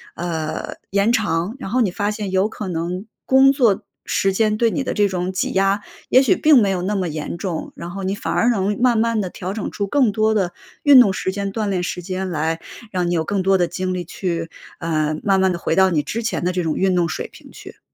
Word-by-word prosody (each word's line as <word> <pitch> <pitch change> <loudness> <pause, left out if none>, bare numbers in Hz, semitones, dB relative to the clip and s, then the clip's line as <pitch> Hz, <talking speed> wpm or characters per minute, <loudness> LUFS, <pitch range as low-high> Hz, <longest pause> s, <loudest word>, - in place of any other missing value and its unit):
呃， 160 -2 -4
延 200 +4 +2
长。 205 -3 0
然 230 - -6
后 250 +5 +1
你 225 -6 +3
发 205 +3 -1
现 210 -2 -4
有 190 +3 +2
可 210 - -6
能， 180 +3 -3 0.2
工 265 +1 +6
作 235 -8 +2 0.3
时 195 0 +2
间 215 +1 +1
对 230 0 +2
你 275 - -1
的 - - -2
这 205 -1 +3
种 185 -1 -2
挤 185 - -1
压 195 +1 +2 0.3
也 255 - +6
许 365 - +3
并 310 -4 +5
没 200 - +2
有 185 -2 -1
那 200 +4 -1
么 185 -3 -1
严 155 +2 -5
重， 170 -3 -4
然 170 - -7
后 195 +2 -6
你 190 +1 -1
反 165 -5 -3
而 230 +8 +3
能 205 -2 +1
慢 245 -2 +4
慢 230 0 +1
地 185 - -3
调 185 +2 -5
整 210 -1 -4
出 200 - -2
更 255 0 +3
多 215 +1 +2
的 190 -5 0 0.3
运 285 -3 +8
动 205 -6 +6
时 190 - -2
间、 200 0 -3
锻 215 -2 -1
炼 185 -2 0
时 180 - -3
间 185 +1 -4
来 160 0 -1 0.3
让 180 -2 -1
你 - - 0
有 165 -2 +1
更 200 +3 -1
多 195 +1 +3
的 175 -1 +1
精 185 +1 -3
力 180 -1 -3
去， 170 -1 -4 0.3
呃， 155 -2 0
慢 195 -2 +3
慢 190 0 +3
地 170 - -4
回 165 - -1
到 190 +1 +5
你 155 -3 +2
之 220 +11 -4
前 225 - -2
的 180 - +1
这 180 -1 -1
种 160 -2 -1
运 190 -1 +1
动 175 -1 +2
水 155 - -4
平 - - -15
去。 - - -12
190 Hz, 270 characters per minute, -20 LUFS, 175-215 Hz, 0.3 s, 运